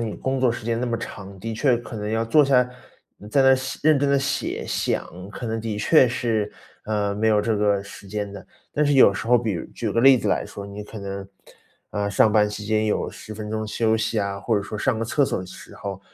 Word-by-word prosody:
你 110 Hz, -3 st, -3 dB
工 130 Hz, 0 st, -2 dB
作 130 Hz, -2 st, +4 dB
时 115 Hz, -1 st, -5 dB
间 115 Hz, +1 st, -1 dB
那 125 Hz, -, -1 dB
么 120 Hz, -, -1 dB
长， 100 Hz, -3 st, -8 dB
的 115 Hz, +4 st, -5 dB
确 125 Hz, +2 st, +2 dB
可 120 Hz, 0 st, -9 dB
能 105 Hz, 0 st, -4 dB
要 115 Hz, +1 st, 0 dB
坐 150 Hz, +6 st, +5 dB
下， 125 Hz, -3 st, +3 dB, 0.5 s
嗯， 105 Hz, -, -11 dB
在 135 Hz, +5 st, +3 dB
那 135 Hz, 0 st, +7 dB
写 130 Hz, 0 st, -4 dB
认 155 Hz, -2 st, +5 dB
真 140 Hz, -, +1 dB
地 140 Hz, 0 st, +3 dB
写， 140 Hz, +1 st, -2 dB
想， -, -, -1 dB, 0.2 s
可 120 Hz, -, -6 dB
能 115 Hz, 0 st, -2 dB
的 110 Hz, -2 st, -3 dB
确 130 Hz, +4 st, +5 dB
是， 115 Hz, -3 st, -1 dB, 0.3 s
呃， 105 Hz, -2 st, -1 dB
没 110 Hz, +2 st, +1 dB
有 105 Hz, -1 st, +4 dB
这 110 Hz, +1 st, 0 dB
个 100 Hz, -1 st, +1 dB
时 100 Hz, 0 st, -12 dB
间 105 Hz, 0 st, -3 dB
的。 100 Hz, -2 st, -9 dB, 0.3 s
但 150 Hz, -, +1 dB
是 145 Hz, 0 st, +2 dB
有 130 Hz, -7 st, +7 dB
时 105 Hz, -, -5 dB
候， 125 Hz, +1 st, +5 dB
比 115 Hz, -3 st, -1 dB
如 85 Hz, -, -4 dB
举 -, -, -3 dB
个 115 Hz, -, +2 dB
例 135 Hz, +1 st, +8 dB
子 -, -, -3 dB
来 -, -, +1 dB
说， 100 Hz, 0 st, -8 dB
你 100 Hz, +1 st, -7 dB
可 105 Hz, +1 st, -9 dB
能， 100 Hz, 0 st, -6 dB, 0.6 s
呃， 100 Hz, -1 st, -2 dB
上 105 Hz, +2 st, +4 dB
班 105 Hz, -1 st, +4 dB
期 105 Hz, 0 st, -6 dB
间 110 Hz, +1 st, +1 dB
有 105 Hz, -, -1 dB
10 110 Hz, -, -10 dB
分 105 Hz, 0 st, -6 dB
钟 110 Hz, 0 st, -2 dB
休 110 Hz, 0 st, +1 dB
息 110 Hz, 0 st, 0 dB
啊， 100 Hz, -1 st, -2 dB
或 110 Hz, +1 st, +1 dB
者 100 Hz, -, 0 dB
说 105 Hz, +1 st, -6 dB
上 115 Hz, 0 st, 0 dB
个 115 Hz, -, -1 dB
厕 145 Hz, +6 st, +1 dB
所 -, -, -2 dB
的 90 Hz, -, -6 dB
时 -, -, -12 dB
候， 100 Hz, -1 st, -6 dB
110 Hz, 275 characters per minute, -23 LUFS, 105-120 Hz, 0.6 s, 例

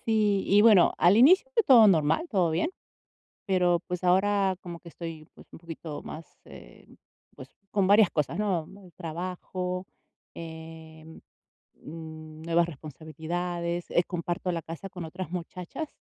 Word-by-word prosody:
sí, 210 Hz, -3 st, +2 dB
y 205 Hz, +1 st, +5 dB
bueno, 210 Hz, -6 st, +6 dB
al 180 Hz, +4 st, +5 dB
inicio 370 Hz, -, +6 dB
fue 460 Hz, -, +4 dB
todo 245 Hz, -, +7 dB
normal, 160 Hz, -, +2 dB
todo 185 Hz, -6 st, +2 dB
bien, 165 Hz, -, 0 dB, 0.8 s
pero, 180 Hz, -2 st, +2 dB
pues 180 Hz, 0 st, -4 dB
ahora 190 Hz, +1 st, +2 dB
como 175 Hz, -1 st, -8 dB
que 170 Hz, -, -13 dB
estoy, 165 Hz, -2 st, -8 dB
pues, -, -, -16 dB
un -, -, -11 dB
poquito 165 Hz, -2 st, -8 dB
más, 160 Hz, +1 st, -8 dB, 0.2 s
em, -, -, -15 dB, 0.4 s
pues -, -, -11 dB, 0.2 s
con 200 Hz, -2 st, +1 dB
varias 205 Hz, -1 st, +6 dB
cosas, 150 Hz, +3 st, -1 dB
¿no? 190 Hz, -7 st, -1 dB
Muy 195 Hz, -2 st, -15 dB
trabajo, 180 Hz, +2 st, -5 dB, 0.5 s
em, 160 Hz, -1 st, -10 dB, 0.6 s
mm, 155 Hz, -1 st, -10 dB
nuevas 170 Hz, +1 st, +2 dB
responsabilidades, 170 Hz, +3 st, -5 dB
eh, 175 Hz, -, +3 dB
comparto 175 Hz, +1 st, -3 dB
la 165 Hz, -, -3 dB
casa 165 Hz, +4 st, -8 dB
con 180 Hz, -2 st, -7 dB
otras 175 Hz, +1 st, -7 dB
muchachas. 180 Hz, -, -6 dB
175 Hz, 145 wpm, -27 LUFS, 160-190 Hz, 0.8 s, todo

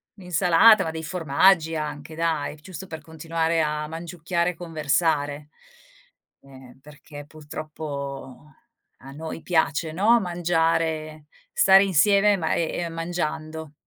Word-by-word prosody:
un'insalata, 180 Hz, +3 st, +4 dB
ma 160 Hz, -, -3 dB
dei 160 Hz, 0 st, -6 dB
formaggi 165 Hz, 0 st, +2 dB
anche 150 Hz, 0 st, -5 dB
dai, 160 Hz, -3 st, -1 dB
giusto 185 Hz, +4 st, -10 dB
per 160 Hz, -2 st, -8 dB
continuare 165 Hz, +1 st, -2 dB
a 150 Hz, 0 st, -2 dB
mangiucchiare 170 Hz, +2 st, -2 dB
e -, -, -14 dB
conversare, 150 Hz, -3 st, -1 dB, 0.9 s
ehm, 130 Hz, -2 st, -16 dB
perché 145 Hz, 0 st, -12 dB
purtroppo 145 Hz, -3 st, -8 dB, 0.5 s
a 135 Hz, -, -12 dB
noi 160 Hz, +3 st, -7 dB
piace, 160 Hz, -2 st, 0 dB
no, 215 Hz, +7 st, +4 dB
mangiare, 165 Hz, -3 st, -1 dB, 0.3 s
stare 195 Hz, 0 st, +6 dB
insieme, 200 Hz, +3 st, +4 dB
ma, 160 Hz, -2 st, -1 dB
ehm, 170 Hz, 0 st, -2 dB
mangiando. 160 Hz, -2 st, -4 dB
160 Hz, 115 wpm, -24 LUFS, 150-175 Hz, 0.9 s, stare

